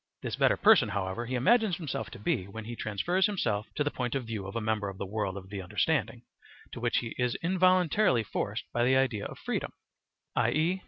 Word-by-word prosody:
This - - -2
better - - +3
person, 195 - +6
however, 100 +3 -3
he 130 - -2
imagines 210 - +3
himself 135 - -4
to - - -10
be 95 -2 -1
when 110 +3 -7
be 120 +2 -6
transfers 170 - +1
himself 110 - -1
to 145 - +1
the 145 - -1
point 125 0 -3
of 130 -3 -2
view 110 -4 -4
of 100 - -8
a - - +1
member 110 -2 -1
of 95 - -9
the 100 - -4
world 100 -1 -2
of 95 0 -10
the 100 -2 -4
understanding, 90 - 0 0.5
to - - -7
which - - +1
he 115 -2 -5
is 125 -1 +1
involuntarily 185 - +3
forced 100 +1 -3
by 120 - +2
the 130 +2 +4
idea 125 -6 +1
of - - -7
freedom, - - -3 0.6
i.e. 170 +5 +2
120 Hz, 215 wpm, -29 LUFS, 105-160 Hz, 0.6 s, person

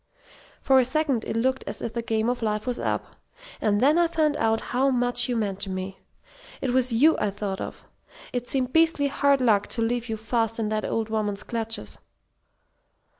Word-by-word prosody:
"For 265 -1 +5
a - - +5
second 270 -2 0
it - - -3
looked 260 +3 0
as - - -3
if 230 - -4
the 235 - -2
game 225 -1 0
of 245 0 -1
life 210 -1 -1
was 250 -1 -2
up. - - -3 0.4
And 205 -1 +2
then 295 +7 +4
I 345 - +4
found 310 -3 +1
out 225 0 +2
how 265 +2 +3
much 245 -1 +1
you 245 - 0
meant 200 -4 -2
to 195 - -3
me. 190 0 -5 0.6
It 265 - -1
was 255 0 +2
you 285 +8 +5
I 210 - +1
thought 200 -1 -4
of. - - -7 0.5
It 245 -1 -3
seemed 255 -2 -1
beastly 325 -3 +3
hard 280 -1 +2
luck 215 -5 +3
to 230 - -1
leave 240 +1 -1
you 220 - -2
fast 225 0 -1
in 220 -2 -1
that 215 -1 -1
old 225 -1 -2
woman's 210 -2 -2
clutches!" 225 -1 -4
235 Hz, 200 wpm, -25 LUFS, 220-260 Hz, 0.6 s, For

